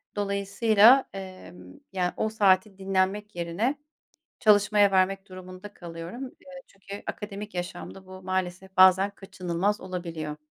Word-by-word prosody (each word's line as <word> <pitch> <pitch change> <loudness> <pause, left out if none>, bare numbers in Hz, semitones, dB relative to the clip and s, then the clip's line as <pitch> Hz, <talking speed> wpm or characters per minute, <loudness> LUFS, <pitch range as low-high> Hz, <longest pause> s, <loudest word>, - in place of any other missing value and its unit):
Dolayısıyla, 205 +5 +4
emm, 185 - -10 0.2
yani, 180 -2 -1
o 220 - 0
saati 195 -2 +2
dinlenmek 195 +2 -1
yerine 175 +11 -1 0.7
çalışmaya 205 -2 +4
vermek 195 +1 +1
durumunda 185 +2 -11
kalıyorum. 170 +8 -8 0.2
Eee, 270 -1 -12
çünkü 195 +1 -10
akademik 210 0 -6
yaşamda 180 +1 -6
bu 185 0 -11
maalesef 185 0 -4
bazen 190 +2 +6
kaçınılmaz 190 +1 -3
olabiliyor. 165 -5 -5
190 Hz, 115 wpm, -26 LUFS, 185-205 Hz, 0.7 s, bazen